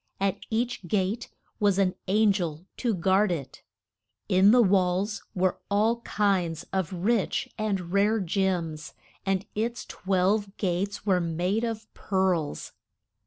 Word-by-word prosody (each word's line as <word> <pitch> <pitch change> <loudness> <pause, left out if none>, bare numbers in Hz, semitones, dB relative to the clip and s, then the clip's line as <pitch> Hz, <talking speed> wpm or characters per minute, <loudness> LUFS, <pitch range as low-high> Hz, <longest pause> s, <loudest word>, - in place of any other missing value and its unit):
At 195 -1 0
each 230 -4 -2
gate 205 +5 -1 0.3
was 205 -3 +3
an 190 -2 +2
an 210 +2 +4
gel 175 -4 -3
to 235 -4 0
guard 190 +3 +3
it. 145 -6 -5 0.7
In 190 0 +5
the 245 +2 +6
walls 195 +1 +1
were 185 0 +1
all 215 +3 +2
kinds 185 -7 0
of 190 -4 -1
rich 210 +7 0
and 195 -5 -2
rare 210 +3 +3
gems, 175 -5 -1 0.3
and 195 0 +1
its 235 +3 -2
twelve 195 +2 0
gates 195 +2 -2
were 185 -3 +3
made 175 +6 -1
of 225 -2 -3
pearls. 185 -6 -1
195 Hz, 130 wpm, -27 LUFS, 180-210 Hz, 0.7 s, the